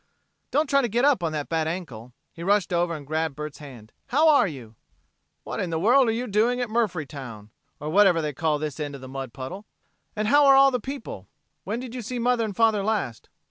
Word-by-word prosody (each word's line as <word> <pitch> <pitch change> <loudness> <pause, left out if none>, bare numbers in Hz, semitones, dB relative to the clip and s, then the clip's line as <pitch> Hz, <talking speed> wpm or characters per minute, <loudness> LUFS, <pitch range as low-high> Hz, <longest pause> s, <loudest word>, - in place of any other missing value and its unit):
"Don't 300 +2 +1
try 275 0 +3
to 245 - 0
get 240 +4 +1
up 285 -9 +3
on 165 -2 -1
that 150 -2 -3
bad 160 -1 -1
ankle." 135 -9 -6 0.2
He 165 - -11
rushed 195 0 +1
over 170 -1 +1
and 145 -2 -9
grabbed 155 0 -2
Bert's 150 0 -7
hand. 125 -7 -12
"How 305 +6 +4
are 290 -8 +5
you?" 125 - -9 0.7
"What - - -5
in 180 - -2
the 165 - -1
world 245 +7 +4
are - - +2
you 235 +3 -2
doing 230 +3 +1
at 245 -2 -2
Murphytown? 145 - -3 0.3
or 150 - -5
whatever 190 -2 +5
they 150 -2 -2
call 155 +2 0
this 150 -1 -5
end 145 -2 -4
of 135 - -10
the 130 - -9
mud 135 -1 -6
puddle. 175 - -8 0.5
And 215 0 -1
how 290 +2 +6
are 275 - +8
all 275 0 +6
the 250 - -1
people? 270 +4 -7 0.4
When 225 +3 -3
did 250 -2 -8
you 250 - -5
see 245 +3 -5
mother 240 0 +1
and 210 -3 -4
father 220 -2 +3
last?" 205 - -2
185 Hz, 230 wpm, -25 LUFS, 150-240 Hz, 0.7 s, are